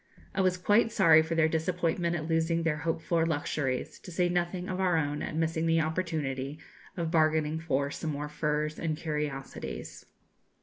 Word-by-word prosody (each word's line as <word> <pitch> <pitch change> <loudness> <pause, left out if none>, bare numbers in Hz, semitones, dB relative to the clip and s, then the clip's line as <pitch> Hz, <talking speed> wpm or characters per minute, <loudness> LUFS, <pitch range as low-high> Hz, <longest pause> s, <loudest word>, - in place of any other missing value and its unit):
I 195 - +1
was 185 -1 +2
quite 210 +5 +3
sorry 165 -7 +6
for 160 +1 -2
their 160 -1 +4
disappointment 170 +1 0
at 155 -2 -3
losing 165 0 +1
their 160 -2 +1
hoped 160 +1 -2
for 165 +1 +2
luxuries, 145 -4 -2
to - - -11
say 175 0 +1
nothing 175 +1 -1
of 185 0 -3
our 180 -3 +3
own 150 -1 -1
at - - -4
missing 160 0 0
the 165 0 +3
opportunity 155 -4 -2 0.4
of 165 -2 -1
bargaining 155 -1 +2
for 140 -3 0
some 160 - -4
more 145 +1 -3
furs 150 +1 -1
and 155 -2 -1
curiosities. 150 -4 -5
160 Hz, 175 wpm, -29 LUFS, 150-170 Hz, 0.4 s, sorry